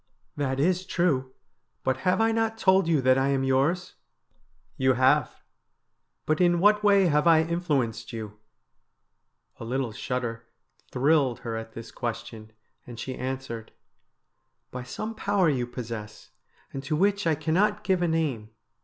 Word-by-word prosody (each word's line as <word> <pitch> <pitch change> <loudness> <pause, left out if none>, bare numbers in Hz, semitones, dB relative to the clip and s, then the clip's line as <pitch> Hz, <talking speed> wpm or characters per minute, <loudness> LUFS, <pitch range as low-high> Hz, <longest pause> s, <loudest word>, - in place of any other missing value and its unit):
' - - -45
That 135 -2 -2
is 180 +5 +2
true, 140 -9 0 0.5
but 130 -1 0
have 180 +2 +1
I 225 0 +3
not 225 0 0
told 190 -4 +3
you 160 -4 +2
that 130 +1 +4
I 135 - +1
am 135 -1 +1
yours? 140 +7 +1 0.3
' - - -41
' - - -40
You 130 - +5
have. 130 +3 +2 0.8
But 155 +3 +1
in 175 -1 +4
what 210 +3 +4
way 200 -2 +5
have 150 -1 +2
I 160 -1 +6
influenced 145 -10 -2
you? 110 -2 -7 0.6
' - - -45
A - - -7
little 125 +1 -2
shudder 120 -1 -4 0.4
thrilled 135 -2 +2
her 115 -1 -4
at 115 0 -7
this 115 - -9
question, 110 -2 -6 0.4
and 120 -2 -9
she 130 - -4
answered: 130 -3 -5 0.5
' - - -51
By 125 - -5
some 215 - -5
power 200 -5 +1
you 125 -3 -1
possess, 115 -4 -8 0.4
and 135 - -4
to 145 +3 -1
which 200 +2 +1
I 160 - +3
cannot 185 +8 +1
give 185 -2 +1
a 175 - +2
name. 150 -10 -1
135 Hz, 165 wpm, -26 LUFS, 125-175 Hz, 0.8 s, I